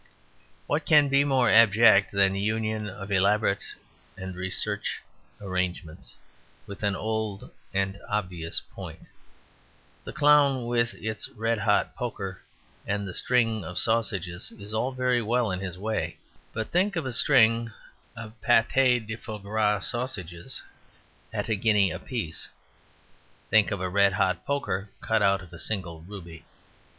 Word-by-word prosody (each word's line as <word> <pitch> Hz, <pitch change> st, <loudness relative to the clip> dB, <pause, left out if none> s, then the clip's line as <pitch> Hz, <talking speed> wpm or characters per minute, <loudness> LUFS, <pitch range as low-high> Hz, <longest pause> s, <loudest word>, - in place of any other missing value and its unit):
What 150 Hz, +2 st, 0 dB
can 150 Hz, -3 st, +6 dB
be 140 Hz, +1 st, +4 dB
more 130 Hz, -4 st, +3 dB
abject 110 Hz, -2 st, +6 dB
than 100 Hz, -1 st, +3 dB
the 100 Hz, -, -2 dB
union 110 Hz, 0 st, -1 dB
of 100 Hz, +1 st, -8 dB
elaborate 100 Hz, +1 st, +2 dB, 0.5 s
and 95 Hz, 0 st, -6 dB
recherche 100 Hz, +3 st, -1 dB, 0.4 s
arrangements 90 Hz, -4 st, -4 dB, 0.5 s
with 100 Hz, 0 st, -9 dB
an 100 Hz, -2 st, +1 dB
old 110 Hz, -2 st, -3 dB, 0.2 s
and 95 Hz, 0 st, -1 dB
obvious 90 Hz, -5 st, -2 dB
point? -, -, -9 dB, 1.0 s
The -, -, -7 dB
clown 145 Hz, -4 st, +4 dB
with 120 Hz, 0 st, +1 dB
the 110 Hz, 0 st, -5 dB, 0.2 s
red 115 Hz, +1 st, 0 dB
hot 105 Hz, -1 st, +1 dB
poker 100 Hz, -7 st, -5 dB, 0.5 s
and 100 Hz, 0 st, -1 dB
the 90 Hz, -, -6 dB
string 115 Hz, -3 st, +1 dB
of 90 Hz, -, -7 dB
sausages 100 Hz, -6 st, 0 dB
is 105 Hz, +1 st, -8 dB
all 125 Hz, +4 st, 0 dB
very 125 Hz, -1 st, +1 dB
well 115 Hz, -1 st, +1 dB
in 90 Hz, -, -2 dB
his 95 Hz, -2 st, -5 dB
way. 110 Hz, +3 st, -3 dB, 0.3 s
But 110 Hz, -1 st, -4 dB
think 190 Hz, +3 st, +2 dB
of 165 Hz, -, -2 dB
a 130 Hz, -, -3 dB
string 115 Hz, -3 st, +4 dB, 0.4 s
of 110 Hz, -2 st, -8 dB
pate 125 Hz, -1 st, +3 dB
de 110 Hz, +1 st, -4 dB
foie 110 Hz, -1 st, -7 dB
gras 105 Hz, 0 st, 0 dB
sausages 95 Hz, -9 st, -3 dB, 0.7 s
at -, -, -3 dB
a -, -, +1 dB
guinea 105 Hz, -2 st, +3 dB
a -, -, -5 dB
piece! 115 Hz, -, -4 dB, 1.0 s
Think 110 Hz, 0 st, +5 dB
of 100 Hz, -, -3 dB
a 95 Hz, -, -2 dB
red 100 Hz, +1 st, +3 dB
hot 95 Hz, 0 st, 0 dB
poker 110 Hz, -9 st, -2 dB
cut 110 Hz, -1 st, 0 dB
out 100 Hz, -1 st, +3 dB
of 90 Hz, 0 st, -15 dB
a 85 Hz, -, -9 dB
single 85 Hz, -6 st, -4 dB
ruby! 85 Hz, -3 st, -10 dB
105 Hz, 145 wpm, -27 LUFS, 95-115 Hz, 1.0 s, can